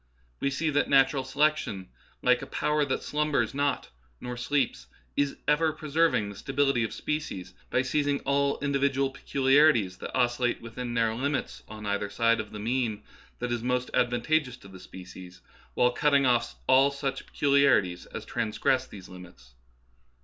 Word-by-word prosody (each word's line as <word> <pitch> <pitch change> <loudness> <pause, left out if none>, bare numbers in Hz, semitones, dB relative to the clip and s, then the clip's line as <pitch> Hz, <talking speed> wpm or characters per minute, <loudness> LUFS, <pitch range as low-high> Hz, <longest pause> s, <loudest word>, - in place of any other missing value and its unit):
We 140 - 0
see 155 +4 -1
that 145 - +1
natural 135 0 +4
selection, 130 -8 0 0.3
like 125 0 +3
a - - -7
power 150 0 0
that 130 - -2
slumbers 150 -6 0
not 140 -2 -1 0.3
nor 125 0 -6
sleeps, 135 +4 -1 0.3
is 145 -1 0
ever 155 +2 +3
preserving 155 -7 +1
the 100 - -9
stability 135 +1 0
of 110 - -3
spe 150 0 -2
cies 95 -10 -8 0.2
by 130 - +1
seizing 145 +1 0
all 140 0 +1
individual 140 -1 +1
peculiarities 135 -8 +3
that - - -7
os 120 -1 +1
cillate 120 -1 0
within 120 +1 -6
narrow 115 -1 +1
limits 140 +2 -2
on 105 -1 -9
either 100 0 -1
side 115 +2 +2
of 110 -1 -5
the 105 - -7
mean 110 -1 -2 0.3
that 125 0 -4
is 120 -1 -1
most 125 +1 -1
advantageous 125 +2 +1
to 100 - -15
the 95 -1 -12
species, 90 0 -12 0.3
while 125 0 +3
cutting 140 +2 +2
off 120 - +1
all 135 - +5
such 140 -1 -4
peculiarities 140 -11 +2
as - - -8
trans 115 -3 -3
gress 130 0 +1
these 95 -3 -11
limits. 90 -10 -14
130 Hz, 165 wpm, -27 LUFS, 110-140 Hz, 0.3 s, all